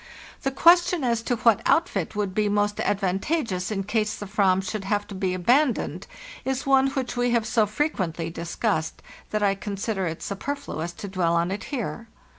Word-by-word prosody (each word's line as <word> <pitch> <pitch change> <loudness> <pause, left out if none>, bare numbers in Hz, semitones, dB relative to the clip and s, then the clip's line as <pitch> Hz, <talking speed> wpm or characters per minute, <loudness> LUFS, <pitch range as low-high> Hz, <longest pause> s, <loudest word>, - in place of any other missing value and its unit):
The 270 - 0
question 345 +3 +4
as 235 -2 +1
to 245 +1 -1
what 230 -2 +3
outfit 210 - +1
would 205 -2 -1
be 210 +1 +1
most 205 0 +1
advantageous 195 - 0
in 200 -3 -2
case 210 +1 0
the 205 - -7
frram 195 -2 +2
should 195 +1 -4
have 205 +1 0
to - - -7
be 190 -1 -1
abandoned 245 - +1 0.4
is 265 0 -2
one 270 -1 +4
which 265 -2 -3
we 245 0 +1
have 235 -2 +2
so 220 -1 +2
frequently 185 - -2
discussed 170 0 -2 0.3
that 215 -1 -1
I 200 -1 +4
consider 195 -1 -3
it 165 0 -5
superfluous 200 - -4
to 200 - -7
dwell 180 -3 +1
on 170 +2 +1
it 200 - -4
here. 230 - -4
210 Hz, 180 wpm, -25 LUFS, 190-245 Hz, 0.4 s, question